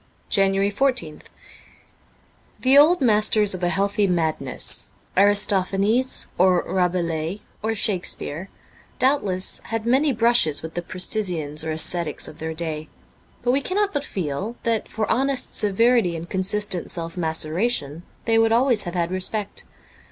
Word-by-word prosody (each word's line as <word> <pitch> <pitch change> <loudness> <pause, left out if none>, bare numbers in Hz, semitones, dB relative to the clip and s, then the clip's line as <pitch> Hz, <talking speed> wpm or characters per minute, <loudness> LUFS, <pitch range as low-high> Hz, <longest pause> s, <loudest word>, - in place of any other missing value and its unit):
H - - -3
JANUARY 195 +1 +2
14th 205 - -1 1.3
THE 260 +1 +3
old 305 +4 +6
masters 215 -3 +3
of 185 - -6
a 175 - +2
healthy 200 +2 +1
madness 160 -7 -2
— - - -36
Aristo 200 +1 +4
phanes 210 +8 0
or 180 -1 +4
Rabelais 175 0 -1 0.2
or 225 +1 -1
Shakespeare 185 -3 -2 0.2
— - - -29
doubtless 205 -9 +1
had 225 -1 -4
many 270 +5 +3
brushes 230 - +3
with 160 0 -7
the 175 - -3
precisians 175 -5 -1
or 160 - -4
ascetics 160 0 +1
of 155 - -12
their 160 0 -5
day, 155 -2 -5 0.5
but 245 - +2
we 270 +2 +1
cannot 400 +6 -1
but 290 -2 -2
feel 190 - -4
that 230 -2 -1
for 220 0 -3
honest 270 +1 0
severity 215 -2 +2
and 165 +1 -7
consistent 190 0 -1
self 165 -1 -4
maceration 160 - -1 0.2
they 225 -1 +3
would 225 0 +3
always 235 -3 +3
have 175 +1 -5
had 170 0 -1
respect. 195 +2 -2
195 Hz, 145 wpm, -22 LUFS, 170-225 Hz, 1.3 s, old